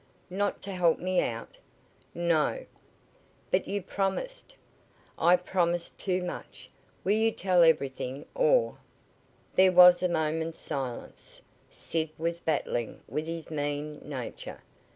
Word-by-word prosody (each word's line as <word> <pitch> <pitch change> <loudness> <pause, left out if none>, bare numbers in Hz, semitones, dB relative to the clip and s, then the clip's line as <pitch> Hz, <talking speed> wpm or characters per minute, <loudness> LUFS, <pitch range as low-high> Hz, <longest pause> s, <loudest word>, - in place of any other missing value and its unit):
"Not 200 +2 -1
to 200 - -5
help 175 -3 +3
me 185 0 +1
out?" 115 0 -5 0.6
"No!" 170 - +1 0.9
"But - - +1
you 200 -1 -2
promised 350 - -3 0.4
" - - -35 0.2
"I 175 +2 +6
promised 175 -1 -1
too 185 -2 -1
much! 180 - -8 0.3
Will 195 - +1
you 220 +1 +3
tell 185 -4 +2
everything, 140 -4 +1
or - - +2 0.4
" - - -34
There 185 0 +7
was 180 0 +8
a 180 - +2
moment's 160 0 -1
silence. 130 -3 -6 0.3
Sid 160 -1 -3
was 170 +1 -2
battling 145 -8 -2
with 155 +1 -3
his 165 -1 -6
mean 145 0 -3
nature. 130 -5 -7
170 Hz, 130 wpm, -29 LUFS, 155-185 Hz, 0.9 s, was